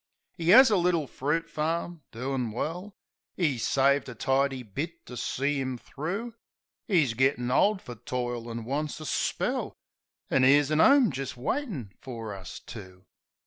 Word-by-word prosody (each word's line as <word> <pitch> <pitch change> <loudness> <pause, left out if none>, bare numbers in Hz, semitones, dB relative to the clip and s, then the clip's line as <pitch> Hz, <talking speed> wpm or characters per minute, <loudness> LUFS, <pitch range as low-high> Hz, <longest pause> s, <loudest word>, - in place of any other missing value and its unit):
'E 165 +1 +3
'as 255 +3 +9
a 205 - +4
little 175 -3 +2
fruit 150 +5 -2
farm, 165 +2 -2
doin' 125 0 -2
well; 175 - -4 0.4
'E 150 -9 +1
saved 140 +3 +2
a 125 - -8
tidy 135 +2 0
bit 155 - -6
to 125 - -9
see 140 +4 -1
'im 130 -1 -3
thro'; 190 - -5 0.5
'E's 155 - +3
gittin' 125 0 +1
old 200 +8 +3
fer 120 - -7
toil, 120 0 -4
an' 115 0 -5
wants 145 +5 -3
a 155 - -7
spell; - - -1 0.6
An' 130 - +3
'ere's 145 +2 +5
a 155 +1 +4
'ome 270 - +6
jist 135 -1 -5
waitin' 145 - -3
fer 115 -5 -6
us 95 -2 -8
two. 95 -4 -11
140 Hz, 155 wpm, -28 LUFS, 125-165 Hz, 0.6 s, as